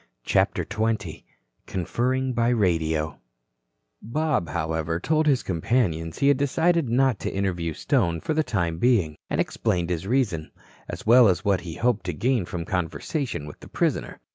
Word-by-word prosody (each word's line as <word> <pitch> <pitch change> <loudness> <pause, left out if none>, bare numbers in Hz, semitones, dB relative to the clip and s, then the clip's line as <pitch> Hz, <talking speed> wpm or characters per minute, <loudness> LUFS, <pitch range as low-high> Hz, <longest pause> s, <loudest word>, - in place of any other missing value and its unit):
CHAPTER - - +1
XX 110 -5 -2 0.4
CONFERRING 125 +8 -1
BY 120 0 +2
RADIO 80 - 0 0.8
Bob, 135 - -1
however, 80 0 -2
told 155 - +1
his 135 -4 +3
companions 85 -3 0
he 140 - +2
had 140 -1 +5
decided 160 +2 +1
not 125 -2 +2
to - - -3
interview 90 -4 -2
Stone 85 - 0
for 155 - -1
the 155 - +2
time 85 - -1
being, 105 -12 +2
and - - -1
explained 90 -1 0
his 90 +2 -3
reason, 105 -11 0 0.4
as - - -6
well 120 +1 +7
as 95 +1 +1
what 100 -3 +2
he 85 -2 -7
hoped 120 -5 0
to 90 - -1
gain 120 - 0
from 85 -1 -5
conversation 95 - -3
with 75 - -10
the - - -13
prisoner. - - -1
100 Hz, 160 wpm, -25 LUFS, 85-125 Hz, 0.8 s, well